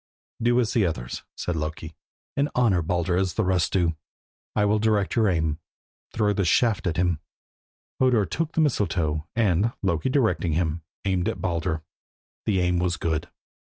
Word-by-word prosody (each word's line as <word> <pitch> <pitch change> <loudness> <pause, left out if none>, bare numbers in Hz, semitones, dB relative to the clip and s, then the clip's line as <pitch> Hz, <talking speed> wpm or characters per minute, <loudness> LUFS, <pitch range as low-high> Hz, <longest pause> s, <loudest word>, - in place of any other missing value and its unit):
"Do 120 +1 +3
as 120 -3 +1
the 115 - +3
others," 60 -9 -3 0.2
said 90 - -2
Loki, 80 +1 -4 0.4
"and 140 +1 +1
honour 110 -8 +3
Baldur 85 +2 0
as 95 -1 0
the 110 - +1
rest 90 -3 +1
do. 85 -4 +2 0.6
I 105 - +3
will 105 +1 +3
direct 105 -3 +1
your 110 -3 +4
aim. 80 -3 0 0.5
Throw 105 -2 +1
this 100 -3 0
shaft 100 -1 +2
at 85 - -1
him." 90 -3 +1 0.8
Hodur 125 -6 +4
took 165 +7 -2
the 160 - +2
mistletoe 85 - 0
and, 110 0 +2
Loki 95 +5 +1
directing 110 - +1
him, 80 0 0 0.2
aimed 95 -2 +1
at - - -4
Baldur. 85 -2 -1 0.6
The 95 -4 +2
aim 90 0 +2
was 90 -1 0
good. 80 +1 -2
90 Hz, 165 wpm, -25 LUFS, 85-110 Hz, 0.8 s, your